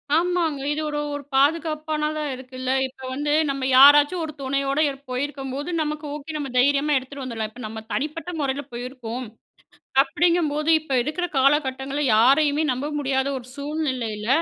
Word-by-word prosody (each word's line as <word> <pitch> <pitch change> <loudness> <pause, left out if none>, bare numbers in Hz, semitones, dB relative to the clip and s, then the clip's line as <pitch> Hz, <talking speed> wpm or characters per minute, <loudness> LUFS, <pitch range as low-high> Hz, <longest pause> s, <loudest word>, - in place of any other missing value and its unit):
ஆமாங்க. 335 -3 +1
இது 300 +1 -1
ஒரு 295 0 -2
ஒரு 290 0 -5
பாதுகாப்பானதா 305 +1 +1
இருக்குல்ல. 255 0 -5 0.2
இப்போ 260 0 -16
வந்து 290 +2 -2 0.2
நம்ம 275 -1 -2
யாராச்சும் 290 +5 +7
ஒரு 310 - -7
துணையோட 275 +1 -1
இருப்போ 270 -2 -7
இருக்கும்போது, 275 +1 -5
நமக்கு 300 0 -3
ஓகே, 300 +2 -7
நம்ம 285 -2 -4
தைரியமா 285 +3 +3
எடுத்துட்டு 265 +1 -6
வந்துரலாம். 225 -4 -4
இப்போ 245 +2 -11
நம்ம 220 0 -7
தனிப்பட்ட 310 +4 -3
முறையில 275 0 -1
போயிருக்கோம். 250 0 -6 0.8
அப்படிங்கும்போது, 320 -1 +1
இப்போ 295 -3 -4
இருக்கற 355 +5 -2
காலகட்டங்கள்ல 275 0 +1
யாரையுமே 285 +6 +4
நம்ப 270 +4 -3
முடியாத 265 -1 0
ஒரு 245 - -13
சூழ்நிலையில, 260 -8 -3
280 Hz, 140 wpm, -23 LUFS, 260-300 Hz, 0.8 s, யாராச்சும்